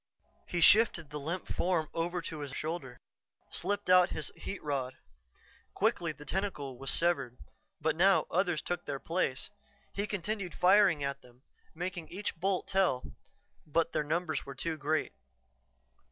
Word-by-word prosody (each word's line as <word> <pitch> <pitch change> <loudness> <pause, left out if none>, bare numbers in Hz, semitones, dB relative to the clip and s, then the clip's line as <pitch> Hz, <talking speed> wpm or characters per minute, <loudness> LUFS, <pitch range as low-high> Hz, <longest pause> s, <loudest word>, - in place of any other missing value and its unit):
He 175 - -1
shifted 170 -6 +6
the 150 - -4
limp 170 +6 -3
form 170 -3 0
over 175 +1 -1
to 155 0 -5
his 140 -2 -5
shoulder, 145 -5 -4 0.5
slipped 205 +3 -2
out 180 0 +7
his 150 - -4
heat 195 - -6
rod. 135 -3 -2 0.8
Quickly 190 -6 +1
the 150 0 -12
tentacle 145 -7 -3
was 135 - -3
severed. 140 -8 +1 0.4
But 160 0 +1
now 190 +3 +5
others 175 -2 +1
took 175 0 -3
their 140 -1 -3
place; 150 -2 -1 0.4
he 200 +1 -1
continued 205 -1 -3
firing 185 -5 +5
at 140 0 -2
them, 125 +1 -20 0.3
making 175 -1 -4
each 205 +3 -4
bolt 185 +2 0
tell, 190 -10 +1 0.6
but 165 +2 +1
the - - 0
numbers 155 -1 -1
were 140 - -8
too 160 +4 -2
great. 155 +1 0
165 Hz, 150 wpm, -32 LUFS, 145-185 Hz, 0.8 s, out